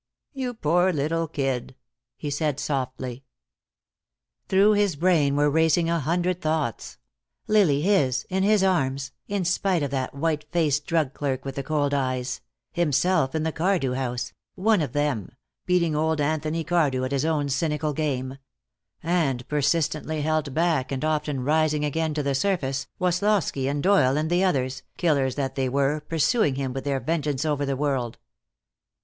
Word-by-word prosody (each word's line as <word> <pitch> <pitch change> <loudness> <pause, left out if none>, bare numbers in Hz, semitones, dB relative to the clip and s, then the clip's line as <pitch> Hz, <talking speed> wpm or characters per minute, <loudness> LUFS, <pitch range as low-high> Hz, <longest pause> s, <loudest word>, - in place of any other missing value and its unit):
"You 255 -3 -4
poor 175 0 +2
little 165 +2 -1
kid," 135 -4 -2 0.4
he 145 - -4
said, 145 -1 -1
softly. 130 -2 -3 1.3
Through 195 +2 +5
his 205 -5 +2
brain 155 -4 +2
were 145 +1 +3
racing 160 +2 +2
a 170 - +1
hundred 175 +4 0
thoughts; 155 -7 -2 0.5
Lily 185 -10 +3
his, 155 -10 +2
in 190 0 -1
his 205 0 +3
arms, 140 -7 0 0.2
in 200 -3 -1
spite 185 -1 +1
of 140 - -2
that 130 -1 -2
white 150 +1 -1
faced 150 -4 +1
drug 160 -5 +1
clerk 135 -2 -3
with 135 - -4
the 140 - -3
cold 145 -1 0
eyes; 130 -2 -1 0.3
himself 170 -2 +1
in 155 - 0
the 160 - 0
Cardew 165 -6 0
house, 125 -2 -3 0.2
one 205 0 +2
of 140 -5 -3
them, 145 -9 -1 0.3
beating 170 -3 +2
old 160 +1 +1
Anthony 155 +2 -1
Cardew 150 -6 +1
at 130 - -2
his 140 0 0
own 155 -3 0
cynical 150 +1 -1
game; 135 -3 -2 0.6
and 155 -7 0
persistently 155 +1 0
held 155 -1 0
back 160 -5 +1
and 135 +2 -2
often 150 -4 -1
rising 150 +1 +2
again 155 +1 -1
to 150 - -1
the 140 0 0
surface, 135 -4 -1
Woslosky 180 -6 +1
and 145 0 -2
Doyle 175 -9 +4
and 155 +2 -1
the 175 +2 +3
others, 130 -7 0 0.2
killers 140 -7 +1
that 135 -2 -2
they 135 -2 -1
were, 140 +3 +1
pursuing 160 - +1
him 135 -2 -3
with 135 +1 -5
their 140 -1 0
vengeance 150 -2 -1
over 145 -2 0
the 135 -1 -1
world. 135 -5 -1
150 Hz, 160 wpm, -25 LUFS, 135-170 Hz, 1.3 s, Through